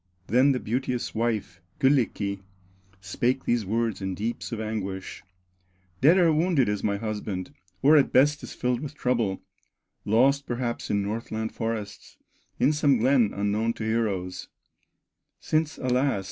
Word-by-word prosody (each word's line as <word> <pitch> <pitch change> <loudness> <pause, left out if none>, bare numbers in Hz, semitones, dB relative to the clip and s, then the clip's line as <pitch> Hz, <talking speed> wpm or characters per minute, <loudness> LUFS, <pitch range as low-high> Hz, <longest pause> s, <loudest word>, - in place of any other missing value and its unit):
Then 130 +7 +4
the 130 - 0
beauteous 125 +2 -2
wife, 110 -6 -2 0.2
Kyllikki, 120 -8 +1 0.6
Spake 120 +7 -1
these 120 -4 0
words 115 0 -1
in 95 -1 -3
deeps 115 +6 -4
of 115 - -4
anguish: 100 -3 -4 0.8
"Dead 160 +8 +6
or 170 -3 +4
wounded 160 -4 +2
is 105 -1 -2
my 100 -1 0
husband, 105 -4 -4 0.3
Or 150 +3 +7
at 140 - +3
best 145 +3 +4
is - - -8
filled 125 -1 0
with 145 +1 -7
trouble, 115 -8 -1 0.6
Lost 135 +6 +3
perhaps 120 -1 -3
in 100 -1 +1
Northland 110 +1 -4
forests, 115 -3 -5 0.4
In 140 +4 +4
some 145 -3 +3
glen 120 -2 +3
unknown 105 +3 0
to 110 - -7
heroes, 105 -5 -2 0.9
Since 155 0 -1
alas! 130 -3 +1
115 Hz, 140 wpm, -26 LUFS, 105-135 Hz, 0.9 s, Or